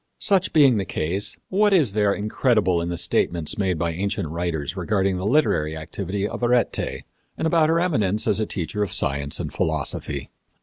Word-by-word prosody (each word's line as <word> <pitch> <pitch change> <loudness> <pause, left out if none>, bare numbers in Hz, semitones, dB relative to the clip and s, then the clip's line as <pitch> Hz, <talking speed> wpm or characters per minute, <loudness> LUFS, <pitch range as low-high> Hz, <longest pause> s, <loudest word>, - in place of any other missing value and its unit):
Such 195 -4 +1
being 140 -7 +5
the 100 - 0
case, 95 +4 -3
what 205 +2 +3
is 145 - +3
there 105 -1 +2
incredible 105 -3 +1
in 85 - -3
the 85 - -3
statements 85 0 0
made 95 -4 +1
by 85 +1 -1
ancient 90 -2 -2
writers 85 -1 -3
regarding 95 0 0
the 95 +2 -2
literary 80 - +2
activity 95 +5 -3
of - - -6
Arete, 120 0 0 0.3
and - - -2
about 160 -1 +3
her 165 +1 +3
eminence 110 - +1
as 105 -1 +2
a 110 - -1
teacher 100 +3 -3
of 100 - -1
science 70 +1 -1
and - - -4
philosophy? 70 -2 -2
100 Hz, 180 wpm, -23 LUFS, 85-120 Hz, 0.3 s, being